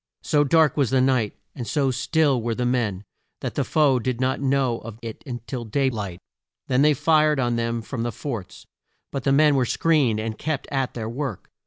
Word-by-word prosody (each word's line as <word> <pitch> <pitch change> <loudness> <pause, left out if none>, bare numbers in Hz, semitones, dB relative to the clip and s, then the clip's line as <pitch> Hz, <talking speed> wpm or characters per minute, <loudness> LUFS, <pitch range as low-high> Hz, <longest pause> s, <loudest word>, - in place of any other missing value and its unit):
So 150 -3 +3
dark 155 0 +3
was 140 -5 +2
the 130 - +2
night, 130 -5 +2 0.2
and 120 -4 -6
so 140 -4 +1
still 140 0 +1
were 115 0 -2
the 125 - -1
men, 115 -6 0 0.4
that - - -3
the - - 0
foe 145 -5 +3
did 125 0 -2
not 130 +1 0
know 135 -3 +1
of 110 -1 -9
it 115 -1 -7 0.2
till 125 -3 -4
day 130 +4 0
light. 100 -6 -5 0.5
Then 130 +1 +2
they 150 0 +5
fired 155 0 +3
on 120 -2 +1
them 115 0 -1
from 120 +1 -5
the 120 +1 -1
forts, 115 -11 -6 0.5
but 135 -3 -4
the 135 - +3
men 150 +1 +5
were 135 -2 +3
screened 135 -4 +2
and 110 0 -4
kept 155 -3 -3
at 135 -2 -1
their 110 -2 -4
work. 125 - -5
130 Hz, 205 wpm, -24 LUFS, 115-140 Hz, 0.5 s, they